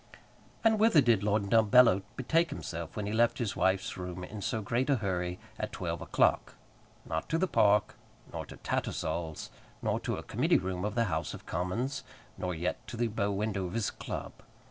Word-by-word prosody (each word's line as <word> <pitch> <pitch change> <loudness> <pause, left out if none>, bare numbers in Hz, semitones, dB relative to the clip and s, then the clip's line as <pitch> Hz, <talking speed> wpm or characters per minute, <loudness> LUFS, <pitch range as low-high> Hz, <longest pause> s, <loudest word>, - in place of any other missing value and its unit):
And 220 -1 +4
whither 220 -7 +6
did 120 -7 +4
Lord 100 -1 0
Dumbello 110 -2 +6
betake 165 +6 +2
himself 85 -1 -6
when 105 - -3
he 105 - -2
left 120 +1 +3
his 115 -6 -2
wife's 95 0 +1
room 90 0 -5
in 105 +3 -7
so 110 +3 -1
great 120 +6 -1
a 140 - +5
hurry 90 -5 -2 0.2
at - - -3
twelve - - -3
o'clock? - - +2 0.5
Not 80 0 -3
to 165 - +2
the 190 +3 +2
Park, 105 - +3 0.4
nor - - -3
to - - -10
Tattersall's, 80 0 -3 0.3
nor - - +1
to - - -2
a - - -6
Committee - - +2
room 95 +1 -2
of 105 - -2
the 115 - +3
House 80 -7 -2
of - - -12
Commons, 115 +11 -2 0.3
nor 90 -1 -3
yet 90 +3 -3
to 120 - -6
the 120 0 +1
bow 105 -2 -1
window 100 -2 -1
of 90 - -7
his 115 -3 0
club. - - -6
105 Hz, 190 wpm, -31 LUFS, 90-120 Hz, 0.5 s, whither